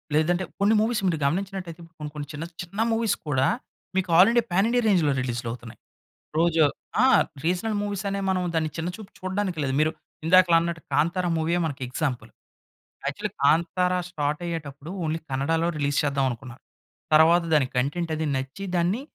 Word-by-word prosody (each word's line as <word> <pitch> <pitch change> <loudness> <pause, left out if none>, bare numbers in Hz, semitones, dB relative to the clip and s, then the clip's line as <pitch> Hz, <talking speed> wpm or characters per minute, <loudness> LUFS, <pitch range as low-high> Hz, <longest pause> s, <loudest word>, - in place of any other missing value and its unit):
లేదంటే 175 +4 +2 0.2
కొన్ని 205 +2 +4
మూవీస్ 225 0 +1
మీరు 165 -3 +1
గమనించినట్టయితే 180 +1 -2
ఇప్పుడు 165 +1 -18
కొన్ని 150 -1 -5
కొన్ని 145 -1 -5
చిన్న 150 +2 -5 0.2
చిన్న 185 +4 -8
మూవీస్ 225 -2 +1
కూడా 135 -2 +2 0.5
మీకు 185 -2 0
ఆల్రెడీ 230 +6 +6
పాన్ 195 +5 +3
ఇండియా 245 0 +2
రేంజ్‌లో 170 -8 +3
రిలీజ్‌లు 120 -1 -3
అవుతున్నాయి. 120 -1 -10 0.6
రోజు 165 -1 +3 0.4
ఆ! - - +6 0.4
రీజనల్ 185 +6 0
మూవీస్ 205 -1 -3
అనే 200 0 -2
మనం 185 -1 +1
దాన్ని 160 -1 0
చిన్న 165 +2 -2
చూపు 215 -3 -11
చూడ్డానికి 185 -2 -2
లేదు. 130 -1 -1
మీరు 155 +1 +3 0.3
ఇందాకల 175 0 +6
అన్నట్టు 170 -1 -3
'కాంతార' 175 +3 +1
మూవీయే 170 +2 +1
మనకి 140 -4 -5
ఎగ్జాంపుల్. 130 -2 -3 0.8
యాక్చువలి - - -3
'కాంతార' 175 +4 +3
స్టార్ట్ 150 -2 -2
అయ్యేటప్పుడు 150 -3 -6 0.2
ఓన్లీ 160 +1 -1
కన్నడాలో 160 +5 0
రిలీజ్ 145 -1 +1
చేద్దాం 140 -2 +1
అనుకున్నారు. 120 +1 -9 0.5
తర్వాత 165 +3 +6
దాని 145 -4 +4
కంటెంట్ 160 +6 -1
అది 160 - -2
నచ్చి 135 +9 -4
దాన్ని 180 +8 +1
165 Hz, 165 wpm, -25 LUFS, 145-185 Hz, 0.8 s, ఆల్రెడీ